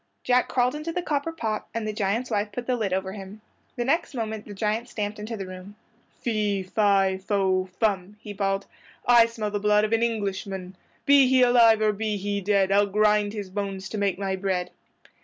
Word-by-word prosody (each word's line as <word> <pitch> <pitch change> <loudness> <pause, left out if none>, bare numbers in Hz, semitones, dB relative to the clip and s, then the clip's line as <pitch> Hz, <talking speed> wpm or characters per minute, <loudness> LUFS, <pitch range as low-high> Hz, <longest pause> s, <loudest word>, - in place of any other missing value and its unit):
Jack 250 0 +3
crawled 250 0 +1
into 305 +2 -4
the 355 +1 -3
copper 295 0 -1
pot 220 -9 -3
and 225 -1 -2
the 215 - -2
giant's 210 +4 -1
wife 205 +1 -1
put 240 +4 -5
the 255 - 0
lid 215 -5 -2
over 190 0 -1
him. 200 +1 -9 0.4
The 240 - -2
next 310 +2 0
moment 220 -2 -4
the 205 - -8
giant 220 +4 -1
stamped 210 -1 -4
into 220 +2 -5
the 195 - -5
room. 185 +2 -10 0.5
"Fee, 210 -4 0
fi, 195 -1 +2
fo, 190 -1 +1
fum," 205 -2 0
he 210 -1 -8
bawled, 195 0 -1 0.4
"I 240 -1 +6
smell 220 -2 -4
the 205 - -1
blood 210 0 +3
of 215 - -2
an 225 - +2
Englishman; 195 -4 -3 0.3
Be 280 -2 +6
he 255 0 +5
alive 230 -3 +5
or 215 -1 +3
be 215 0 -2
he 200 +1 -2
dead, 195 -1 +2
I'll 200 +1 +4
grind 210 0 +2
his 205 -3 -6
bones 195 -1 -4
to 215 - -4
make 200 -2 0
my 195 -1 -2
bread!" 185 -2 -2
210 Hz, 205 wpm, -25 LUFS, 195-230 Hz, 0.5 s, I